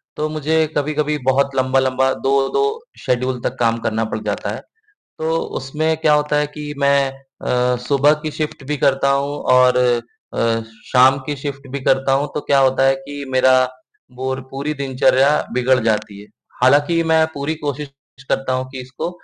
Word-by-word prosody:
तो 155 0 -1
मुझे 155 +1 +1
कभी-कभी 150 +1 0
बहुत 140 +1 +1
लंबे-लंबे 130 0 +2
2 140 - +1 0.2
शेड्यूल 125 0 0
तक - - -2
काम 115 -1 +2
करना 110 0 0
पड़ - - -4
जाता - - -3
है। - - -8 0.6
तो 160 +1 0 0.2
उसमें 155 +4 -1
क्या 155 -2 +3
होता 150 0 +1
है 150 0 +1
कि 150 0 -5
मैं 140 -1 +3 0.3
अ, 125 0 +1
सुबह 145 +2 +4
की 155 - -2
शिफ्ट 150 -2 -4
भी 150 - -1
करता 140 0 +2
हूँ 140 +1 0 0.2
और 125 0 +5 0.6
अ, 115 -1 +1 0.3
शाम 130 +2 +6
की 145 - -3
शिफ्ट 140 0 -6
भी 140 - -3
करता 135 0 +2
हूँ, 140 +2 +1
तो 150 - -1
क्या 140 -1 +2
होता 130 0 +3
है 135 0 +4
कि 140 +1 -8
मेरी 130 0 +4 0.5
बोर 130 +1 -3
पूरी 140 +3 -3
दिनचर्या 135 0 +2 0.2
बिगड़ 125 +1 +2
जाती 105 -2 -1
है। 105 - -15 0.3
हालाँकि 145 +6 +4
मैं 160 0 +5
पूरी 145 +3 -2
कोशिश 145 -1 -4 0.4
करता 130 -1 0
हूँ 130 0 -2
कि 130 - -7
इसको 130 +6 -5
135 Hz, 170 wpm, -19 LUFS, 130-150 Hz, 0.6 s, शाम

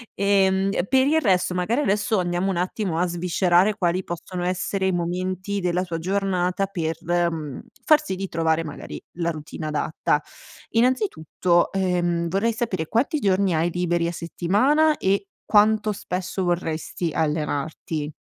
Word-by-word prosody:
Ehm, 195 -1 +3 0.2
per 265 +1 +3
il 315 +2 +4
resto, 185 -4 +2
magari 220 +10 +1
adesso 210 -2 +1
andiamo 175 +2 0
un - - -2
attimo 180 -1 -1
a 180 - +2
sviscerare 180 +3 +2
quali 180 -1 0
possono 175 +1 -5
essere 190 +1 -1
i - - +2
momenti 185 +3 -2
della 180 0 0
tua 170 -3 -4
giornata 185 +1 0
per, 165 -4 -3
mhmm, 165 -5 -1 0.2
far 305 -1 +6
sì 190 - -3
di 195 +1 -4
trovare 165 0 +1
magari 150 -2 -8 0.2
la 170 -1 0
routine 155 +1 -7
adatta. 150 0 0 0.5
Innanzitutto, 200 - +1
ehm, 175 -3 0
vorrei 200 +6 +1
sapere 205 -8 -2
quanti 270 +7 +1
giorni 195 - +2
hai 165 +2 +1
liberi 175 -1 0
a - - -2
settimana 250 - +2
e 195 +1 0 0.2
quanto 215 0 +4
spesso 185 0 -3
vorresti 170 -1 -2
allenarti. 150 0 -2
180 Hz, 145 wpm, -23 LUFS, 170-200 Hz, 0.5 s, far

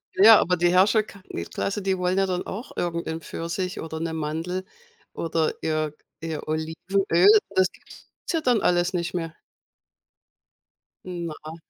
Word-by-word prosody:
Ja, 215 +3 +9
aber 180 0 +1
die 175 +1 +3
Herrscherka 200 +1 +3 0.3
Klasse, 200 +1 -2
die 190 -1 0
wollen 180 +1 0
ja 195 - +3
dann 180 -1 -2
auch 225 +7 -6
irgendein 170 -1 -3
Pfirsich 170 +4 -4
oder 160 0 -5
'ne 165 0 -2
Mandel 160 +4 -3 0.5
oder 165 -1 0
ihr 155 -1 -1 0.3
ihr 160 -2 -5
Olivenöl. 170 +3 +1 0.3
Das 185 -1 +3
gibt's - - -17 0.2
ja 330 -3 0
dann 245 -6 +2
alles 175 +1 +2
nicht 175 0 -2
mehr. 165 -2 -3 1.7
Na. 165 -3 -6
175 Hz, 140 wpm, -25 LUFS, 160-190 Hz, 1.7 s, Ja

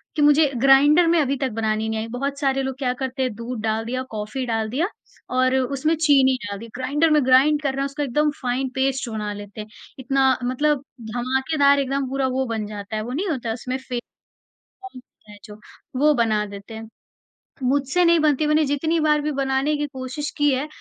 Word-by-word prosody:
कि 305 - 0
मुझे 295 0 +5
ग्राइंडर 285 +6 +5
में 335 0 +3
अभी 275 -1 0
तक 265 0 -1
बनानी 220 0 -1
नहीं 220 - -2
आई। 220 - -4
बहुत 280 +2 -3
सारे 270 -1 +1
लोग 265 -1 -4
क्या 255 -3 -1
करते 260 0 -2
हैं, 255 - -1
दूध 235 +1 -6
डाल 220 0 -1
दिया, 255 +2 -3
कॉफ़ी 215 +4 -4
डाल 225 -2 -1
दिया 290 +10 0 0.5
और 255 0 +3
उसमें 275 +5 0
चीनी 280 -4 +4
डाल 200 0 -5
दी। 230 - -9
ग्राइंडर 285 +6 +1
में 300 -2 +3
ग्राइंड 275 +4 +4
कर 280 -2 0
रहे 275 - -3
हैं, - - 0
उसका 285 +2 -3
एकदम 295 +3 +1
फाइन 255 +1 -1
पेस्ट 265 -1 0
बना 210 -2 -4
लेते 205 +1 -8
हैं। 210 - -9 0.3
इतना 265 0 +2
मतलब 275 +3 0 0.3
धमाकेदार 265 +4 +2
एकदम 275 0 -1
पूरा 270 0 0
वो 265 - +1
बन 225 -3 -3
जाता 205 0 -7
है, 215 - -1
वो 240 - -6
नहीं 340 +10 -2
होता, 240 -7 -2
उसमें 250 +2 -4
फे 255 -2 -5 0.7
फोम 385 -4 -14
होता 230 -4 -17
है 205 - -12
जो, 210 0 -12 0.4
वो 300 +2 +5
बना 220 -4 +1
देते 200 +2 -10
हैं। 220 0 -8 0.8
मुझसे 275 +6 +1
नहीं 340 0 +5
बनती, 305 -1 +2
मैंने 305 +1 +3
जितनी 315 +4 0
बार 300 -1 +2
भी 300 +1 -2
बनाने 270 +1 0
की 295 - -1
कोशिश 260 +3 -5
की 290 -1 +3
है, 265 +3 -2
265 Hz, 210 wpm, -22 LUFS, 235-290 Hz, 0.8 s, मुझे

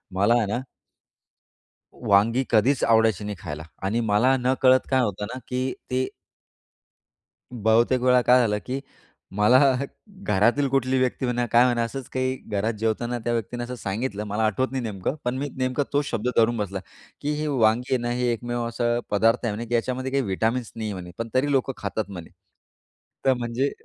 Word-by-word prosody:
मला 100 +5 +3
आहे 115 - +1
ना 120 - 0 1.5
वांगी 115 +6 +4
कधीच 120 +4 +3
आवडायची 110 -3 +3
नाही 105 -1 -4
खायला 75 -3 -6 0.2
आणि 105 +5 0
मला 125 +6 +4
नकळत 130 0 +3
काय 130 -1 +3
होतं 105 -2 -2
ना - - -5
की 130 +1 -1 0.2
ते 130 +1 +1 1.5
बहुतेक 120 +2 +2
वेळा 125 0 +5
काय 125 +1 +5
झालं, 105 -4 +1
की 130 +2 -3 0.6
मला 105 +5 +5 0.7
घरातील 115 +8 +2
कुठलीही 130 0 +1
व्यक्ती 130 0 0
म्हणा, 120 0 0
काय 120 +1 +5
म्हणा 120 -2 +2
असंच 125 +2 -5
काही 130 0 -1
घरात 105 +3 0
जेवताना 115 +2 -1
त्या 120 +1 -2
व्यक्तीने 120 +1 -3
असं 125 +1 -6
सांगितलं. 105 0 -3
मला 105 +2 -2
आठवत 130 +5 0
नाही 130 -1 -2
नेमकं 105 +1 -3
पण 125 +1 -1
मी 145 +2 -2
नेमकं 130 +2 0
तोच 145 0 +2
शब्द 115 -2 -2
धरून 115 +1 +4
बसला, 100 -3 -3 0.4
की 145 - -2
ही 155 - -2
वांगी 125 -3 +2
आहे 130 - +3
ना, 120 - -1
हे 125 +1 0
एकमेव 120 +1 -3
असा 120 0 0
पदार्थ 115 +4 +3
आहे 115 - 0
म्हणे 115 +3 -5
की 120 - -2
याच्यामध्ये 130 +2 -1
काही 135 0 +1
विटामिन्स 115 +4 -1
नाहीये 110 -2 -3
म्हणे, 90 -1 -8
पण 115 0 -3
तरी 135 +3 +2
लोकं 135 0 +1
खातात 110 -2 -4
म्हणे. 90 -4 -8 0.9
तर 135 - +5
म्हणजे 120 +3 -1
120 Hz, 180 wpm, -24 LUFS, 110-130 Hz, 1.5 s, वेळा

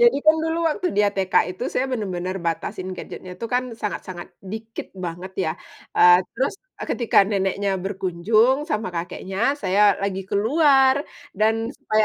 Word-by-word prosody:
Jadi 240 +2 +6
kan 315 - +7
dulu 325 +1 -1
waktu 340 +4 -2
dia 205 0 +4
TK 190 -1 -2 0.2
itu 245 - -4
saya 265 - 0
benar-benar 190 -7 -3
batasin 170 +2 -3
gadgetnya 185 0 -8
itu 230 - -2
kan 250 -1 0
sangat-sangat 185 -4 -6
dikit 220 +3 -7
banget 175 +3 -6
ya, 160 - 0 0.4
eee, 175 0 +8 0.2
terus, 265 +3 0 0.3
eee, - - -4
ketika 235 -2 +2
neneknya 195 0 0
berkunjung 205 - +1
sama 210 -8 -1
kakeknya, 190 +8 -2
saya 200 +2 +4
lagi 195 -1 -2
keluar 270 +4 +4 0.3
dan 225 +3 +1
supaya 215 -6 +1
205 Hz, 150 wpm, -23 LUFS, 185-240 Hz, 0.4 s, eee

